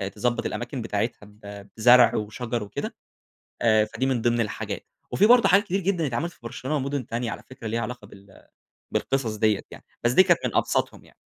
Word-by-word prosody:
تضبط 120 Hz, +3 st, -1 dB
الأماكن 120 Hz, +1 st, -4 dB
بتاعتها 110 Hz, +1 st, -2 dB
ب 105 Hz, -1 st, -12 dB
بزرع 120 Hz, +2 st, +6 dB
وشجر 115 Hz, +2 st, -3 dB
وكده، 100 Hz, -, -5 dB, 0.7 s
آآ 110 Hz, -2 st, +4 dB
فدي 130 Hz, +4 st, -3 dB
من 130 Hz, -4 st, 0 dB
ضمن 120 Hz, 0 st, +2 dB
الحاجات، 105 Hz, -, -4 dB, 0.3 s
وفي 205 Hz, -, +4 dB
برضو 240 Hz, +1 st, +6 dB
حاجات 200 Hz, +3 st, +5 dB
كتير 195 Hz, -1 st, -1 dB
جدًا 180 Hz, -4 st, 0 dB
اتعملت 135 Hz, +8 st, -2 dB
في -, -, -25 dB
برشلونة 130 Hz, +5 st, -4 dB
ومدن 140 Hz, -2 st, -2 dB
تانية- 115 Hz, 0 st, -3 dB
على -, -, -7 dB
فكرة- 130 Hz, -3 st, -10 dB
ليها 115 Hz, +2 st, -1 dB
علاقة 120 Hz, +2 st, -6 dB
بال 100 Hz, 0 st, -17 dB, 0.4 s
بالقصص 125 Hz, -5 st, -1 dB
دِيَّة 105 Hz, -1 st, +2 dB
يعني، -, -, -12 dB, 0.2 s
بس 120 Hz, -, +3 dB
دي 185 Hz, -, +7 dB
كانت 175 Hz, -3 st, +3 dB
من -, -, -3 dB
أبسطُهم -, -, 0 dB
يعني. -, -, -21 dB
120 Hz, 190 wpm, -25 LUFS, 110-135 Hz, 0.7 s, دي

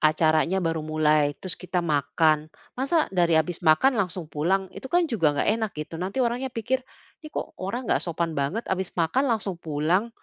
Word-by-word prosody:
acaranya 155 Hz, +3 st, +3 dB
baru 165 Hz, -1 st, 0 dB
mulai, 155 Hz, -1 st, +2 dB
terus 185 Hz, -3 st, -3 dB
kita 180 Hz, -1 st, -2 dB
makan, 155 Hz, +1 st, +2 dB, 0.2 s
masa 275 Hz, +5 st, +1 dB
dari 170 Hz, -3 st, +3 dB
habis 165 Hz, +3 st, 0 dB
makan 180 Hz, -, +4 dB
langsung 180 Hz, -2 st, -2 dB
pulang? 190 Hz, +6 st, +1 dB
Itu 265 Hz, -, -8 dB
kan 350 Hz, +4 st, +3 dB
juga 165 Hz, -, +1 dB
nggak -, -, +1 dB
enak, 220 Hz, -, -1 dB
gitu. 150 Hz, +2 st, -6 dB
Nanti 195 Hz, +8 st, 0 dB
orangnya 245 Hz, +3 st, -1 dB
pikir, 255 Hz, +2 st, -1 dB, 0.4 s
"Ini 310 Hz, -, -9 dB
kok -, -, -5 dB
orang 215 Hz, +7 st, -3 dB
nggak -, -, +1 dB
sopan 170 Hz, -1 st, -2 dB
banget, 155 Hz, +10 st, -2 dB
habis 190 Hz, -1 st, -3 dB
makan 215 Hz, -, +1 dB
langsung 200 Hz, -7 st, -1 dB
pulang." 160 Hz, +8 st, 0 dB
175 Hz, 180 wpm, -25 LUFS, 155-225 Hz, 0.4 s, makan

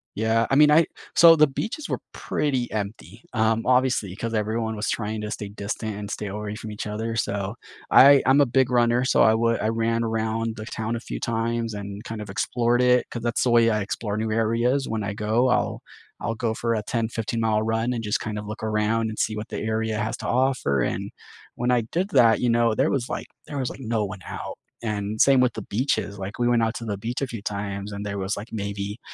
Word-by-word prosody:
Yeah, 110 Hz, +1 st, +2 dB
I 135 Hz, -, +2 dB
mean, 150 Hz, +1 st, +6 dB
I 160 Hz, +2 st, +6 dB, 0.3 s
so 165 Hz, -1 st, +8 dB
the 155 Hz, 0 st, +6 dB
beaches 225 Hz, -, -4 dB
were -, -, -2 dB
pretty 130 Hz, -5 st, -1 dB
empty, 105 Hz, 0 st, -5 dB
um, 110 Hz, 0 st, +1 dB
obviously, 125 Hz, -6 st, +2 dB
'cause 115 Hz, +3 st, -4 dB
everyone 110 Hz, +1 st, -1 dB
was 105 Hz, +1 st, -2 dB
trying 110 Hz, -1 st, -2 dB
to 105 Hz, 0 st, -5 dB
stay 105 Hz, -, -4 dB
distant 105 Hz, +1 st, -4 dB
and 105 Hz, 0 st, -6 dB
stay 105 Hz, -, -4 dB
away 105 Hz, +1 st, -5 dB
from 110 Hz, -, -7 dB
each 105 Hz, -, -5 dB
other, 110 Hz, +2 st, -3 dB
so 100 Hz, -1 st, -2 dB, 0.3 s
I 140 Hz, +1 st, +8 dB
I'm 135 Hz, +2 st, +5 dB
a 140 Hz, -, +5 dB
big 130 Hz, +1 st, +2 dB
runner, 120 Hz, 0 st, +3 dB
so -, -, +4 dB
I 110 Hz, -, +6 dB
would 115 Hz, +1 st, +1 dB
I 110 Hz, -, +1 dB
ran 115 Hz, +1 st, 0 dB
around 110 Hz, 0 st, -1 dB
the 110 Hz, -, -6 dB
town 110 Hz, +1 st, -3 dB
a -, -, -5 dB
few -, -, -6 dB
times 115 Hz, 0 st, -1 dB
and 100 Hz, 0 st, -6 dB
kind 110 Hz, -1 st, -6 dB
of 105 Hz, -, -8 dB
explored 120 Hz, +3 st, +1 dB
it 125 Hz, 0 st, +4 dB
'cause 120 Hz, -1 st, -6 dB
that's 120 Hz, -1 st, 0 dB
the 125 Hz, -, +2 dB
way 115 Hz, -1 st, +5 dB
I 110 Hz, -2 st, +1 dB
explore 105 Hz, +1 st, -3 dB
new 110 Hz, 0 st, -1 dB
areas, 115 Hz, +4 st, +1 dB
when 110 Hz, -1 st, -2 dB
I 100 Hz, +1 st, -3 dB
go, 110 Hz, +4 st, +1 dB
I'll 125 Hz, -, 0 dB, 0.4 s
I'll 115 Hz, -1 st, -2 dB
go 110 Hz, 0 st, -1 dB
for 115 Hz, +1 st, -1 dB
a 110 Hz, -, -1 dB
10, 115 Hz, 0 st, -1 dB
fifteen-mile 110 Hz, -1 st, -1 dB
run 115 Hz, +2 st, 0 dB
and 115 Hz, -, -3 dB
just 105 Hz, -1 st, 0 dB
kind 105 Hz, -1 st, -4 dB
of 105 Hz, -, -5 dB
look 105 Hz, +1 st, -7 dB
around 110 Hz, +1 st, +1 dB
and 110 Hz, -, -7 dB
see 110 Hz, -, 0 dB
what 105 Hz, -, -5 dB
the -, -, -5 dB
area 110 Hz, 0 st, -1 dB
has 110 Hz, +1 st, -2 dB
to -, -, -6 dB
offer 125 Hz, -, +1 dB
and -, -, -2 dB, 0.4 s
when 120 Hz, +1 st, -1 dB
I 125 Hz, -1 st, +3 dB
did 185 Hz, +4 st, 0 dB
that, 120 Hz, -, +5 dB
you 125 Hz, -, +2 dB
know, 115 Hz, -1 st, +3 dB
there -, -, +2 dB
was 130 Hz, -3 st, -1 dB
like -, -, -4 dB, 0.2 s
there 145 Hz, -, -5 dB
was, 130 Hz, -2 st, -1 dB
like, -, -, -9 dB
no 115 Hz, -2 st, -1 dB
one 95 Hz, 0 st, -7 dB
out -, -, -6 dB, 0.3 s
and 105 Hz, -1 st, -2 dB
same 135 Hz, -1 st, +6 dB
with 125 Hz, -2 st, +2 dB
the 110 Hz, -, -5 dB
beaches, 105 Hz, -2 st, -1 dB
like, 100 Hz, +4 st, -6 dB
we 120 Hz, -, +2 dB
went 120 Hz, -1 st, +3 dB
out 110 Hz, 0 st, 0 dB
to 115 Hz, -, -6 dB
the 105 Hz, -3 st, -3 dB
beach 115 Hz, +6 st, -4 dB
a 135 Hz, -, 0 dB
few 115 Hz, -4 st, -6 dB
times 100 Hz, 0 st, -4 dB
and 100 Hz, 0 st, -5 dB
there 100 Hz, 0 st, -3 dB
was 95 Hz, +1 st, -2 dB
like 105 Hz, +3 st, -7 dB
maybe 100 Hz, 0 st, -4 dB
115 Hz, 240 wpm, -24 LUFS, 105-120 Hz, 0.4 s, so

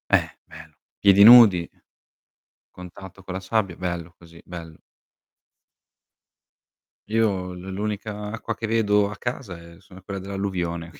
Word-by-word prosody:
Eh -, -, +3 dB, 0.2 s
bello. -, -, -14 dB, 0.3 s
Piedi 100 Hz, 0 st, +6 dB
nudi 105 Hz, -7 st, +8 dB, 1.1 s
contatto 90 Hz, +2 st, -12 dB
con 95 Hz, -, -7 dB
la 95 Hz, -, -4 dB
sabbia. 95 Hz, -2 st, -1 dB
Bello 85 Hz, -2 st, -5 dB
così, 85 Hz, -1 st, -17 dB
bello. 85 Hz, -3 st, -10 dB, 2.3 s
Io 100 Hz, -5 st, 0 dB
l 90 Hz, +2 st, -9 dB
l'unica 105 Hz, +1 st, -5 dB
acqua 115 Hz, 0 st, -5 dB
che 110 Hz, -, -5 dB
vedo 105 Hz, -2 st, +2 dB
a 100 Hz, -, -8 dB
casa 120 Hz, -7 st, -6 dB
è 85 Hz, 0 st, -15 dB
sono 95 Hz, -1 st, -16 dB
quella 100 Hz, +1 st, -7 dB
dell'alluvione. 90 Hz, -4 st, -4 dB
95 Hz, 125 wpm, -23 LUFS, 90-105 Hz, 2.3 s, nudi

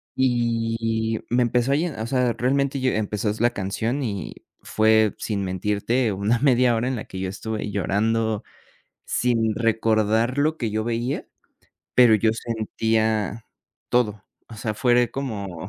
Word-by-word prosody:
Y, 115 Hz, -3 st, 0 dB
me 125 Hz, +1 st, +2 dB
empezó 120 Hz, +2 st, +1 dB
a -, -, +4 dB
llen 160 Hz, +1 st, -1 dB
o 110 Hz, -, -3 dB
sea, 125 Hz, -1 st, +1 dB
realmente, 135 Hz, +2 st, 0 dB
yo 130 Hz, -, +2 dB
empezó 105 Hz, 0 st, -1 dB
la 120 Hz, +1 st, +3 dB
canción, 110 Hz, +8 st, -2 dB
y 100 Hz, -6 st, -4 dB, 0.3 s
fue, 110 Hz, -1 st, +3 dB
sin 100 Hz, -3 st, -2 dB
mentirte, 105 Hz, +5 st, 0 dB
una 100 Hz, +5 st, +1 dB
1/2 125 Hz, -3 st, +4 dB
hora, 115 Hz, +3 st, -1 dB
en 130 Hz, -, -1 dB
la -, -, -6 dB
que 95 Hz, -, -8 dB
yo 95 Hz, 0 st, -2 dB
estuve 105 Hz, +1 st, -4 dB
llorando, 110 Hz, +2 st, 0 dB, 0.6 s
sin 115 Hz, -3 st, +1 dB
recordar 115 Hz, +2 st, +1 dB
lo 155 Hz, +2 st, +2 dB
que 115 Hz, -6 st, -2 dB
yo 110 Hz, +1 st, -1 dB
veía, 120 Hz, +3 st, -2 dB, 0.7 s
pero 120 Hz, -3 st, +7 dB
yo 110 Hz, +1 st, +2 dB
sentía 110 Hz, -1 st, -1 dB, 0.4 s
todo. 105 Hz, -5 st, 0 dB, 0.2 s
O 115 Hz, -, -10 dB
sea, 110 Hz, 0 st, -3 dB
fue 120 Hz, 0 st, +3 dB
como 100 Hz, -9 st, -5 dB
115 Hz, 150 wpm, -23 LUFS, 105-125 Hz, 0.7 s, pero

